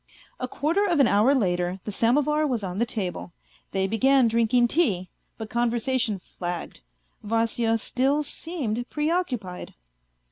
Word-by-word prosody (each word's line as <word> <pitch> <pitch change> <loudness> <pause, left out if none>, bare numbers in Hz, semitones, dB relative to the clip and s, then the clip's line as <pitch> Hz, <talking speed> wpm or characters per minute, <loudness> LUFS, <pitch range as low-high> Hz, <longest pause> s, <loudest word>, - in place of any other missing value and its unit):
A 255 - -2
quarter 320 +10 0
of 340 -5 +1
an 275 - +6
hour 220 +8 +4
later 180 -5 0
the 210 - -5
samovar 295 +8 +2
was 240 -6 -2
on 185 0 -4
the 235 - +1
table. 180 - -4 0.4
They 190 0 0
began 255 +5 +3
drinking 235 +1 +3
tea, 200 - +1 0.3
but 220 -1 -7
conversation 235 -1 0
flagged. 175 - -6 0.4
Vasya 225 +1 +1
still 270 +6 0
seemed 270 -7 -4
preoccupied. 295 - -2
235 Hz, 135 wpm, -25 LUFS, 205-275 Hz, 0.4 s, an